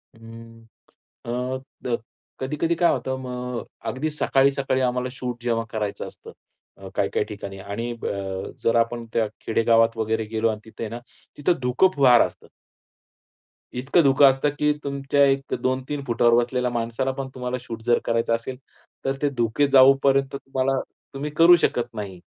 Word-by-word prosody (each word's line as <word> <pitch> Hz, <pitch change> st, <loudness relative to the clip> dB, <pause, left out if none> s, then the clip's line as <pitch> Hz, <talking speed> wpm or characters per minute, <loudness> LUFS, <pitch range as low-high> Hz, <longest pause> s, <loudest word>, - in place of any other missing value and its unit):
हम्म, 115 Hz, 0 st, -13 dB, 0.6 s
अ, 125 Hz, +2 st, -2 dB, 0.2 s
द 120 Hz, -2 st, 0 dB, 0.4 s
कधी-कधी 150 Hz, +5 st, -1 dB
काय 170 Hz, +1 st, +3 dB
होतं 130 Hz, 0 st, -2 dB
मग 125 Hz, -1 st, -5 dB, 0.3 s
अगदी 150 Hz, +5 st, -2 dB
सकाळी-सकाळी 135 Hz, -2 st, +1 dB
आम्हाला 125 Hz, 0 st, 0 dB
शूट 125 Hz, -2 st, -6 dB
जेव्हा 115 Hz, -1 st, 0 dB
करायचं 105 Hz, -2 st, -3 dB
असतं, -, -, -12 dB, 0.5 s
अ, -, -, -10 dB
काही-काही -, -, 0 dB
ठिकाणी 100 Hz, -2 st, -8 dB
आणि 100 Hz, +5 st, -4 dB
ब -, -, -6 dB
अ, 95 Hz, -1 st, -4 dB
जर 115 Hz, -, +2 dB
आपण 115 Hz, 0 st, -1 dB
त्या 115 Hz, -2 st, +2 dB
खेडेगावात 115 Hz, 0 st, +3 dB
वगैरे 110 Hz, 0 st, -1 dB
गेलो 110 Hz, +1 st, 0 dB
आणि 110 Hz, -, -3 dB
तिथे 110 Hz, -, -8 dB
आहे 110 Hz, -, -4 dB
ना 120 Hz, -, -6 dB, 0.4 s
तिथे 145 Hz, +5 st, +2 dB
धुक 125 Hz, +9 st, +3 dB
फार 130 Hz, -4 st, +6 dB
असतं. -, -, -18 dB, 1.3 s
इतकं 130 Hz, +7 st, +2 dB
धुकं 135 Hz, 0 st, +6 dB
असतं 135 Hz, +2 st, +1 dB
की 150 Hz, 0 st, +3 dB
तुमच्या 140 Hz, 0 st, +1 dB
एक 135 Hz, 0 st, 0 dB
2-3 130 Hz, +3 st, -2 dB
फुटावर 120 Hz, 0 st, +3 dB
बसलेल्या 125 Hz, 0 st, -1 dB
माणसाला 120 Hz, +3 st, -1 dB
पण 135 Hz, 0 st, -5 dB
तुम्हाला 125 Hz, 0 st, -3 dB
शूट 115 Hz, -2 st, -8 dB
जर 120 Hz, -, +4 dB
करायचं 115 Hz, 0 st, +1 dB
असेल, 125 Hz, +3 st, -6 dB, 0.5 s
तर 135 Hz, 0 st, 0 dB
ते 145 Hz, -, +2 dB
धुके 120 Hz, +5 st, +2 dB
जाऊपर्यंत 135 Hz, +1 st, +5 dB
तुम्हाला 135 Hz, 0 st, -1 dB, 0.3 s
तुम्ही 145 Hz, +2 st, -4 dB
करू 170 Hz, +1 st, +8 dB
शकत 120 Hz, -9 st, 0 dB
नाही. 100 Hz, -4 st, -6 dB
125 Hz, 160 wpm, -24 LUFS, 115-135 Hz, 1.3 s, करू